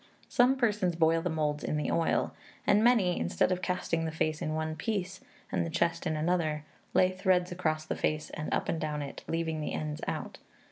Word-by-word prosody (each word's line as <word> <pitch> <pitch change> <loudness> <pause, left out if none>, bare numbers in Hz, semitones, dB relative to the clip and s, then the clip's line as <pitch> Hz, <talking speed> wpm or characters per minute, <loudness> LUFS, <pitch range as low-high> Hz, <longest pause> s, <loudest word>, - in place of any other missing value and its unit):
Some 250 +2 +4
persons 210 -8 +1
boil 165 0 +3
the 175 - -1
moulds 150 -2 -1
in 150 - -1
the 150 - -1
oil; 165 - +1 0.3
and 205 +2 +4
many, 220 -7 +4
instead 85 - +1
of 180 0 0
casting 180 -3 -1
the 160 - -2
face 155 -1 -1
in 155 0 -1
one 155 0 -2
piece, 190 +3 -3 0.3
and - - +1
the 165 - -3
chest 170 +1 0
in 155 - 0
another, 155 -1 0 0.3
lay 185 0 +5
threads 185 -1 +2
across 155 -3 -1
the - - -2
face 155 0 -1
and 155 - -5
up - - 0
and 165 - -1
down 150 -1 -2
it, 140 - -8
leaving 165 -1 -1
the - - -3
ends 150 -1 -3
out. - - -4
165 Hz, 205 wpm, -30 LUFS, 155-180 Hz, 0.3 s, lay